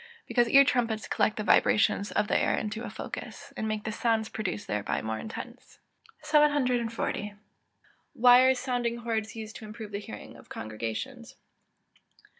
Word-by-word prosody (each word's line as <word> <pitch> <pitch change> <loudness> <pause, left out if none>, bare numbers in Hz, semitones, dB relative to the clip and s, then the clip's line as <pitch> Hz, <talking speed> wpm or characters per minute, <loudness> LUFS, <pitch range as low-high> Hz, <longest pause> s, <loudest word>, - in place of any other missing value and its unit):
_ - - -17 0.2
Because 240 -2 +2
ear 275 +2 +8
trumpets 230 -5 0
collect 215 - +1
the 215 - -2
vibrations 205 -1 +3
of 210 - +1
the - - 0
air - - +2
into 215 +1 -3
a - - -5
focus, - - -8
and 220 - -3
make 215 -1 -2
the 220 - -3
sounds 220 0 0
produced 205 -1 -4
thereby 105 -1 -1
more 110 0 -3
intense. 220 - -9 0.5
740. 250 -8 +1 0.8
_Why 250 +2 +7
are - - +1
sounding 245 -2 -1
hoards 220 -2 -2
used 220 -1 -7
to 220 - -10
improve 215 0 -8
the 200 - -3
hearing 105 - -9
of - - -17
congregations? 110 0 -6
220 Hz, 160 wpm, -28 LUFS, 210-245 Hz, 0.8 s, ear